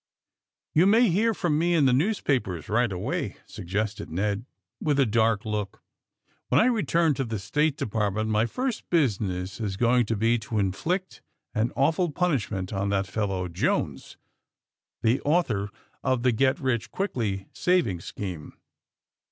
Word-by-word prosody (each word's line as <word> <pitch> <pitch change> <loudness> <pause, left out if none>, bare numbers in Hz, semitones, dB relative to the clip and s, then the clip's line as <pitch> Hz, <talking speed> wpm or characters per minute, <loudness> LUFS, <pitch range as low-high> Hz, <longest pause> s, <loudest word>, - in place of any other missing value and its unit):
You 170 +5 +5
may 225 +3 +5
hear 220 +6 +3
from 170 -7 0
me 175 +1 +2
in 150 -4 +4
the 130 - +4
newspapers, 130 - 0
right 120 +1 +2
away," 90 -1 -3
suggested 100 +4 -4
Ned, 100 +7 -2 0.3
with 145 -3 +1
a 135 - +5
dark 110 -1 +2
look, 105 -2 -4 0.7
^'WTien 125 - +4
I - - +5
return 170 -10 +2
to 135 - -2
the 115 -3 -3
State 145 +9 0
Department 110 -2 -1
my 110 +1 +2
first 250 - -3
business 100 - 0
is 100 -4 -3
going 120 +1 +3
to 115 - 0
be 115 +3 +2
to 110 0 -4
inflict 160 - -1 0.3
an 115 +1 0
awful 160 +5 +2
punishment 115 - -1
on 100 0 -1
that 100 -1 +1
fellow 95 -1 -2
Jones, 85 - -2 0.9
the 115 +4 +2
author 125 - +1 0.3
of 130 -2 +1
the 125 - +4
get 130 +4 +2
rich 120 -4 -1
quickly 110 - -2
savings 170 - +1
scheme. 90 -7 -6
115 Hz, 150 wpm, -26 LUFS, 100-150 Hz, 0.9 s, You